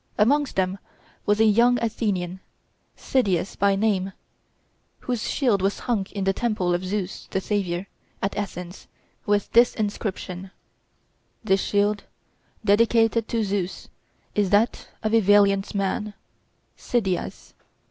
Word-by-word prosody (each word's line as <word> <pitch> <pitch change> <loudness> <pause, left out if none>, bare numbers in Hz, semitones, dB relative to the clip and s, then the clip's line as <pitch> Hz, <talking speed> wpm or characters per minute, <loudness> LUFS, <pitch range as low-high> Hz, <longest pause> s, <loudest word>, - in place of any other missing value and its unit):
'Amongst 275 +6 +2
them 190 +1 0 0.5
was 205 +1 +3
a 220 - +6
young 235 +3 +5
Athenian, 195 -6 -2 0.6
Cydias 200 -9 0
by 200 -1 +3
name, 195 -2 0 0.9
whose 245 -3 -2
shield 235 -9 +2
was 195 +1 0
hung 220 -6 -1
in 200 - -4
the 195 0 +2
temple 200 -6 0
of 175 +1 -1
Zeus 190 0 -4
the 190 - -1
savior, 190 -3 -2 0.3
at 195 - -2
Athens, 180 -3 -6 0.4
with 205 -1 +1
this 240 +1 +5
inscription: 195 -3 -4 0.9
THIS 195 -3 +2
SHIELD, 205 0 +1 0.6
DEDICATED 225 +1 +3
TO 230 -1 0
ZEUS, 195 -2 -3 0.4
IS 205 -2 +1
THAT 210 +5 +2 0.2
OF 215 0 0
A 230 - +6
VALIANT 200 -1 +3
MAN, 205 +1 -1 0.6
CYDIAS. 195 -7 -2
205 Hz, 125 wpm, -24 LUFS, 190-220 Hz, 0.9 s, a